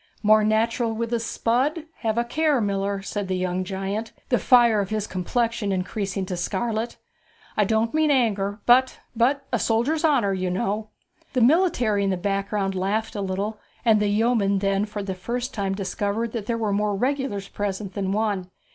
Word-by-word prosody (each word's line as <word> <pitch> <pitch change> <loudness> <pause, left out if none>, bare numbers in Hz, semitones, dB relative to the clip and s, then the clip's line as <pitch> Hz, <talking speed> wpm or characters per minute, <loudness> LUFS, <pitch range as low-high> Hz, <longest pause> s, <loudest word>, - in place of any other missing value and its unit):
'More 215 0 +5
natural 225 +2 +1
with 230 +1 -3
a 235 - +2
spud! 260 +7 0
have 225 -1 -1
a 235 - +3
care, 300 +3 +1
miller,' 200 -1 -1
said 205 0 -3
the 185 0 -1
young 185 0 -1
giant, 195 +4 -4 0.2
the 245 - +3
fire 235 -4 +5
of 195 -2 -1
his 215 -1 -1
complexion 220 +3 -1
increasing 195 0 -2
to 185 -1 -4
scarlet. 220 +6 -2 0.6
'I 210 - +3
don't 220 +2 +1
mean 310 0 +3
anger, 205 -6 +1
but 255 +2 +5 0.2
but 270 +4 +2
a 245 - +2
soldier's 245 +10 +1
honour, 250 -11 +3
you 185 -1 -1
know!' 210 +3 -2 0.4
The 255 - +2
military 245 - +3
in 195 - +1
the 190 - 0
background 195 +1 -1
laughed 200 +5 -1
a 205 - -2
little, 200 +3 -3 0.3
and 220 -2 +5
the 210 - +1
yeoman 210 -2 +2
then 195 +1 +1
for 210 -1 -5
the 195 -1 -3
first 240 +7 -4
time 195 -2 -1
discovered 205 +3 -2
that 220 -3 -5
there 235 - 0
were 215 -3 -1
more 205 0 +1
regulars 250 -4 -1
present 200 -1 -4
than 195 -1 -2
one. 200 -3 -1
210 Hz, 180 wpm, -24 LUFS, 195-235 Hz, 0.6 s, More